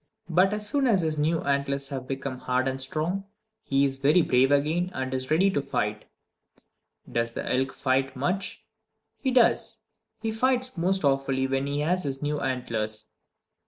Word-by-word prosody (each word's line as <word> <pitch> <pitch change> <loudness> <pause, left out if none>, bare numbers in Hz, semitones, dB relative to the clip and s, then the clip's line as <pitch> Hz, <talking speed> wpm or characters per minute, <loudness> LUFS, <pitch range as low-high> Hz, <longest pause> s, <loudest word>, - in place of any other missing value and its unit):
But 185 +4 +4
as 210 0 -2
soon 275 +4 +1
as 205 -6 +4
his 155 -2 -1
new 160 +2 +1
antlers 140 0 -1
have 130 -3 -5
become 135 -1 -4
hard 125 +1 0
and 135 0 -2
strong, 160 +8 -2 0.4
he 140 0 +2
is 135 -1 -2
very 150 +5 +4
brave 130 0 +3
again, 155 +5 +2
and 130 0 -3
is 130 0 -3
ready 185 +6 +4
to 145 - 0
fight! 105 -5 -2 1.1
Does 115 0 -1
the - - -5
elk 130 +1 +1
fight 135 0 0
much? 180 +9 -2 0.6
He 265 - 0
does! 250 -2 +2 0.4
He 225 - -2
fights 255 +2 +1
most 190 +2 0
awfully 135 -1 +1
when 135 +1 -1
he 145 +1 -1
has 180 +5 +1
his 135 -1 -2
new 150 +1 -1
antlers. 110 -4 -2
140 Hz, 170 wpm, -26 LUFS, 130-180 Hz, 1.1 s, But